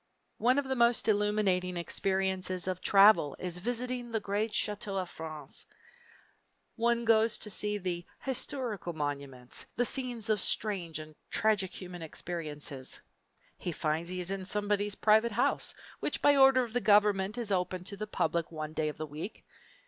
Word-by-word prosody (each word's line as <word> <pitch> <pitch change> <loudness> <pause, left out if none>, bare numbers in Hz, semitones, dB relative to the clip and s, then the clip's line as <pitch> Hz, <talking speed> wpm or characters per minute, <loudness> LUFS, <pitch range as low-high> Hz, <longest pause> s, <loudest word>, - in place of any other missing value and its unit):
One 250 +4 +3
of 285 -1 0
the 265 - 0
most 235 -1 +3
illuminating 205 -4 +1
experiences 190 0 -1
of 185 -1 -2
travel 195 -7 +6
is 180 -1 -4
visiting 245 +3 -3
the 225 - 0
great 210 +2 -1
chateaux 205 -2 -2
of 185 -2 -3
France. 155 -3 -9 1.1
One 235 0 +1
goes 225 0 +4
to 210 - -5
see 185 -4 -1
"historical 245 -8 -1
monuments," 140 -4 -4
the 245 - +2
scenes 245 -3 0
of 210 -2 +2
strange 185 -7 -1
and 155 0 -9 0.2
tragic 210 -4 +2
human 180 -2 -8
experiences; 150 -5 -6 0.6
he 175 - -3
finds 160 +1 -1
he 180 0 -4
is 180 +1 -2
in 195 -1 -3
somebody's 205 +1 0
private 220 +1 +4
house, 240 - +1 0.2
which - - -2
by 290 - +5
order 270 -1 +6
of 230 -2 -7
the 245 - +1
government 205 0 +4
is 230 -4 -3
opened 180 -1 -1
to 200 - -6
the 215 +2 -5
public 170 -5 -1
one 155 -1 -5
day 155 -1 0
of 150 - -8
the 155 - -4
week! 155 +8 -8
195 Hz, 160 wpm, -31 LUFS, 175-220 Hz, 1.1 s, travel